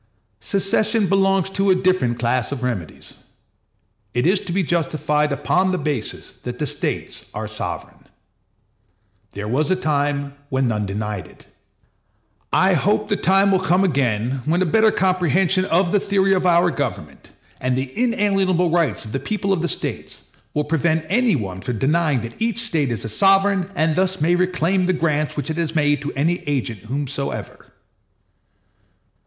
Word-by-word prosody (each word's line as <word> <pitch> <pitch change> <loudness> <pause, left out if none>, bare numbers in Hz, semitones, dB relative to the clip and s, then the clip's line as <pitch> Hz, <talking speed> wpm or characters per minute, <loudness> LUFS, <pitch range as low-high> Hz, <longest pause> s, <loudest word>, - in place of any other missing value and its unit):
Secession 205 +2 +1
belongs 195 -1 +2
to 195 0 +1
a 190 - +5
different 185 -11 +1
class 120 0 0
of 135 -3 -4
remedies. 105 -11 -5 1.0
It 125 - +1
is 185 +3 +3
to 175 - -7
be 190 +2 +1
justified 150 -2 0
upon 180 +7 +1
the 185 - 0
basis 145 -10 -4
that 125 0 -6
the 150 - -2
States - - -3
are - - -4
sovereign. - - -6 1.3
There 105 +1 -5
was 140 +9 0
a 185 - +3
time 145 -4 -1 0.2
when 130 -1 +1
none 105 -3 -1
denied 105 -1 -4
it. - - -17 1.1
I - - +4
hope - - +1
the - - +2
time 195 +2 +3
may 190 - +3
come 185 0 +2
again 130 - 0
when 170 +4 +2
a - - 0
better 220 +6 +4
comprehension 185 -1 +1
of 175 0 +2
the 205 - +3
theory 195 -1 +2
of 185 -1 +1
our 175 0 +4
government, 110 - -5 0.3
and 130 0 0
the 130 0 -3
inalienable 195 -7 +1
rights 165 -12 +1
of 110 - -8
the 135 - -2
people 200 - -1
of 175 - -1
the 175 - 0
States, - - -4 0.3
will 150 - +1
prevent 160 +1 0
any 235 0 +3
one 95 -7 -4
from 125 +2 -3
denying 150 +1 +1
that 115 - -9
each 230 0 0
State 160 - 0
is 115 -2 -4
a - - -2
sovereign, 195 - +3
and 160 -1 +1
thus 190 +1 +1
may 165 +4 +2
reclaim 180 0 +1
the 185 - +2
grants 155 -3 -1
which 145 +2 -1
it 160 - -4
has 165 -1 -2
made 145 -2 +2
to 145 - -4
any 165 +6 0
agent 125 -7 -2
whomsoever. 140 +2 -4
165 Hz, 170 wpm, -21 LUFS, 135-190 Hz, 1.3 s, a